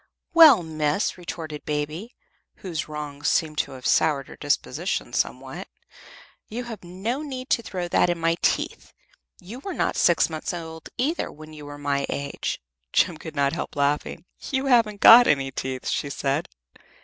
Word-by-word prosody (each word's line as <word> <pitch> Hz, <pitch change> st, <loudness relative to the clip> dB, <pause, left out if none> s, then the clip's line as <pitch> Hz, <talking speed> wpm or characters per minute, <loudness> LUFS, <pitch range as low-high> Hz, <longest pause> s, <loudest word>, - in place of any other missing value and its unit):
"Well, 310 Hz, -, +8 dB
miss," 155 Hz, +3 st, -1 dB
retorted 160 Hz, -4 st, -7 dB
Baby, 150 Hz, +9 st, -4 dB, 0.4 s
whose 170 Hz, -5 st, -5 dB
wrongs 150 Hz, -1 st, -5 dB
seemed 155 Hz, -2 st, +1 dB
to -, -, -1 dB
have 130 Hz, -1 st, -11 dB
soured 145 Hz, -4 st, +2 dB
her -, -, -10 dB
disposition 145 Hz, +4 st, -2 dB
somewhat, -, -, -3 dB, 0.8 s
"you 240 Hz, +3 st, -5 dB
have 225 Hz, -5 st, -8 dB
no 195 Hz, +10 st, -3 dB
need 260 Hz, -3 st, -6 dB
to -, -, +3 dB
throw 185 Hz, -5 st, -4 dB
that 175 Hz, -, +3 dB
in 175 Hz, -, 0 dB
my 165 Hz, 0 st, +2 dB
teeth; -, -, -1 dB, 0.5 s
you 205 Hz, +7 st, -9 dB
were 365 Hz, +5 st, -6 dB
not -, -, 0 dB
six 175 Hz, -, +4 dB
months 160 Hz, +2 st, -4 dB
old, 160 Hz, -2 st, -8 dB
either, 300 Hz, +7 st, -1 dB
when 155 Hz, +1 st, -12 dB
you 150 Hz, -1 st, -10 dB
were 145 Hz, 0 st, -8 dB
my 140 Hz, -1 st, -1 dB
age." 140 Hz, 0 st, -3 dB, 0.3 s
Jem 175 Hz, -3 st, +2 dB
could 155 Hz, 0 st, -9 dB
not 140 Hz, 0 st, +1 dB
help 170 Hz, -, -5 dB
laughing. 145 Hz, +3 st, -1 dB, 0.2 s
"You 265 Hz, 0 st, -1 dB
haven't 230 Hz, -6 st, +3 dB
got 240 Hz, +2 st, +10 dB
any 135 Hz, -2 st, +2 dB
teeth," 130 Hz, -1 st, -4 dB
she 140 Hz, -, -1 dB
said. 140 Hz, 0 st, -1 dB
160 Hz, 165 wpm, -24 LUFS, 145-210 Hz, 0.8 s, got